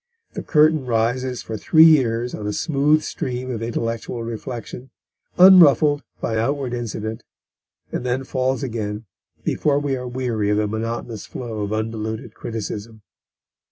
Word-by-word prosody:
The -, -, -4 dB
curtain 155 Hz, -3 st, +3 dB
rises 120 Hz, +2 st, 0 dB
for 110 Hz, -, -5 dB
three 155 Hz, -, +5 dB
years 125 Hz, -7 st, +4 dB
on 105 Hz, -, -5 dB
a 105 Hz, -, -2 dB
smooth 150 Hz, +1 st, +2 dB
stream 130 Hz, 0 st, -4 dB
of 115 Hz, -3 st, -4 dB
intellectual 115 Hz, 0 st, -3 dB
reflection, 120 Hz, +2 st, -7 dB, 0.5 s
unruffled 155 Hz, -6 st, +7 dB, 0.2 s
by 110 Hz, -, -2 dB
outward 135 Hz, +1 st, -1 dB
incident, 110 Hz, -1 st, -4 dB, 0.7 s
and -, -, -3 dB
then 125 Hz, +1 st, -1 dB
falls 130 Hz, +1 st, -1 dB
again 110 Hz, -3 st, -4 dB, 0.4 s
before 145 Hz, -2 st, +1 dB
we 145 Hz, -2 st, -1 dB
are 125 Hz, -1 st, -5 dB
weary 120 Hz, -4 st, -2 dB
of 105 Hz, -, +2 dB
the 105 Hz, -, +1 dB
monotonous 110 Hz, 0 st, -4 dB
flow 115 Hz, -4 st, -6 dB
of 100 Hz, 0 st, -3 dB
undiluted 110 Hz, 0 st, -3 dB
criticism. 110 Hz, 0 st, -6 dB
120 Hz, 140 wpm, -21 LUFS, 110-135 Hz, 0.7 s, unruffled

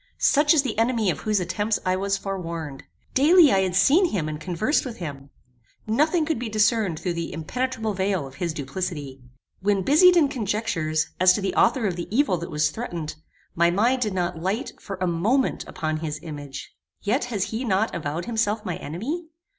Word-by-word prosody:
Such 295 Hz, +1 st, +4 dB
is 285 Hz, -, +4 dB
the 230 Hz, -5 st, -2 dB
enemy 225 Hz, -4 st, +2 dB
of -, -, -5 dB
whose 215 Hz, -2 st, 0 dB
attempts 205 Hz, +4 st, -1 dB
I 185 Hz, 0 st, +2 dB
was 195 Hz, +1 st, 0 dB
forewarned. 170 Hz, -7 st, -5 dB, 0.3 s
Daily 310 Hz, +3 st, +6 dB
I 195 Hz, -, +4 dB
had 185 Hz, -2 st, 0 dB
seen 280 Hz, -, +5 dB
him 185 Hz, -, -2 dB
and 155 Hz, 0 st, -5 dB
conversed 185 Hz, -, 0 dB
with 245 Hz, -4 st, -7 dB
him. 140 Hz, -5 st, -7 dB, 0.6 s
Nothing 305 Hz, +9 st, +2 dB
could 320 Hz, -6 st, -1 dB
be 240 Hz, -2 st, -4 dB
discerned 215 Hz, -5 st, +2 dB
through 180 Hz, -, -2 dB
the 170 Hz, 0 st, -4 dB
impenetrable 225 Hz, -, -2 dB
veil 190 Hz, -4 st, -1 dB
of 135 Hz, -, -11 dB
his 170 Hz, -2 st, 0 dB
duplicity. 145 Hz, -2 st, -5 dB, 0.4 s
When 195 Hz, 0 st, +1 dB
busied 355 Hz, -, +6 dB
in 310 Hz, -4 st, +5 dB
conjectures, 190 Hz, -, -1 dB
as 185 Hz, 0 st, +6 dB
to 205 Hz, -, -2 dB
the 195 Hz, -, -1 dB
author 255 Hz, -5 st, +3 dB
of 180 Hz, -4 st, -1 dB
the 175 Hz, -, -4 dB
evil 225 Hz, -5 st, +2 dB
that 170 Hz, -, -6 dB
was 150 Hz, 0 st, +1 dB
threatened, 170 Hz, -9 st, -5 dB, 0.4 s
my 170 Hz, +1 st, +3 dB
mind 235 Hz, +8 st, +2 dB
did 210 Hz, -5 st, -1 dB
not 175 Hz, -2 st, -2 dB
light, 195 Hz, +8 st, -2 dB
for 195 Hz, -, -6 dB
a 185 Hz, -, 0 dB
moment, 205 Hz, +11 st, +1 dB
upon 155 Hz, -1 st, -3 dB
his 155 Hz, -1 st, -4 dB
image. 145 Hz, -3 st, -8 dB, 0.3 s
Yet 240 Hz, +5 st, +1 dB
has 210 Hz, -6 st, -2 dB
he 225 Hz, +3 st, -2 dB
not 220 Hz, -1 st, +1 dB
avowed 160 Hz, +1 st, -3 dB
himself 220 Hz, -2 st, -1 dB
my 180 Hz, -, -3 dB
enemy? 275 Hz, -, -5 dB
195 Hz, 195 wpm, -24 LUFS, 165-235 Hz, 0.6 s, Daily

